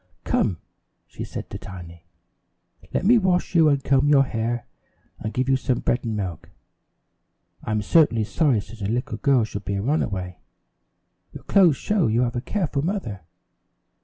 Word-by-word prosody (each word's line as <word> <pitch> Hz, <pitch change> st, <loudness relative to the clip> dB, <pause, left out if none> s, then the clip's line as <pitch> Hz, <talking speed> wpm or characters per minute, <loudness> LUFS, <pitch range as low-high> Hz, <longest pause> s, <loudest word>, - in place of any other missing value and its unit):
"Come," 90 Hz, -, 0 dB, 0.5 s
she -, -, -8 dB
said -, -, -7 dB
to -, -, -6 dB
Tiny, 85 Hz, -4 st, -10 dB, 0.9 s
"let -, -, -1 dB
me 235 Hz, +3 st, +6 dB
wash 185 Hz, -3 st, 0 dB
you 165 Hz, -3 st, +5 dB
and 140 Hz, -2 st, +1 dB
comb 135 Hz, +1 st, +3 dB
your 140 Hz, -2 st, +6 dB
hair, 120 Hz, -2 st, -3 dB, 0.5 s
and 110 Hz, -, -4 dB
give 130 Hz, +2 st, -1 dB
you 135 Hz, -, +4 dB
some 130 Hz, -2 st, 0 dB
bread 120 Hz, -, 0 dB
and 110 Hz, -3 st, -3 dB
milk. 90 Hz, -6 st, -5 dB, 1.1 s
I'm 110 Hz, -1 st, -1 dB
certainly 115 Hz, -6 st, +4 dB
sorry 130 Hz, -1 st, +1 dB
such 105 Hz, +2 st, -13 dB
a 100 Hz, -, -1 dB
little 120 Hz, +4 st, -2 dB
girl 135 Hz, -4 st, +3 dB
should 105 Hz, -1 st, -5 dB
be 100 Hz, -, -3 dB
a 100 Hz, -, -2 dB
runaway. 100 Hz, -, -2 dB, 0.9 s
Your -, -, -10 dB
clothes 175 Hz, -8 st, +4 dB
show 210 Hz, -6 st, +1 dB
you 115 Hz, +2 st, +2 dB
have 120 Hz, -1 st, -1 dB
a 120 Hz, -, -1 dB
careful 155 Hz, -3 st, -2 dB
mother." 165 Hz, -, -3 dB
120 Hz, 165 wpm, -23 LUFS, 105-150 Hz, 1.1 s, me